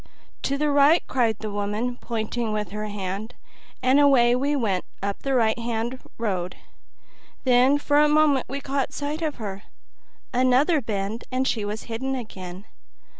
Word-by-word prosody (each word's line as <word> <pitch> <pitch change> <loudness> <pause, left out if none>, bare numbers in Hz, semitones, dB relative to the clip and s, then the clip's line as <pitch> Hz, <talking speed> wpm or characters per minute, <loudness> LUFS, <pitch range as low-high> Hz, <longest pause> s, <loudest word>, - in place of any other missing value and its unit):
"To 275 - -1
the 300 0 +1
right!" 285 +4 +5
cried 235 -4 +1
the 215 -1 -5
woman, 210 +4 -2
pointing 230 0 -2
with 210 -3 -2
her 210 +1 -4
hand, 205 +3 -5 0.5
and 260 +3 +5
away 255 -4 +5
we 280 +3 +1
went 205 -9 0 0.2
up 200 0 -2
the 275 -1 0
right 225 -1 +2
hand 235 +2 -2 0.2
road; 185 -6 -2 0.9
then 255 +2 +5
for 290 0 +2
a 300 0 +5
moment 300 -3 +3
we 280 +2 -4
caught 275 0 -2
sight 295 +2 -3
of 310 -3 -1
her; 200 -4 -6 0.7
another 260 +6 +3
bend 215 0 -3
and 260 +1 0
she 220 - 0
was 210 +1 -4
hidden 265 +4 -3
again. 190 -5 -7
240 Hz, 160 wpm, -24 LUFS, 210-275 Hz, 0.9 s, right